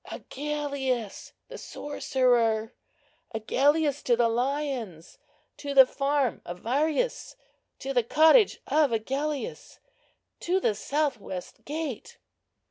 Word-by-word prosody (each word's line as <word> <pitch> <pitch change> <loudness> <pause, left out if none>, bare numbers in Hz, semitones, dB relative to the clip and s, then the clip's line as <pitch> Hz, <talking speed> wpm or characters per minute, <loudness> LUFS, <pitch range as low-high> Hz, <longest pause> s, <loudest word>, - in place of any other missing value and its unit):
Agellius 280 -6 -4
the - - -9
sorcerer! 240 -6 0 0.6
Agellius 285 +6 +2
to 240 - +2
the 235 0 +3
lions! 245 - -3 0.4
To 280 -1 -5
the 265 -1 +10
farm 275 -1 0
of 175 +1 -8
Varius—to 295 - -3
the 245 - +4
cottage 320 - +5
of 300 -4 +2
Agellius—to 305 - -4
the 220 - +1
south 280 +4 -1
west 185 -2 -8
gate!" 295 -5 -5
275 Hz, 95 wpm, -27 LUFS, 235-300 Hz, 0.6 s, the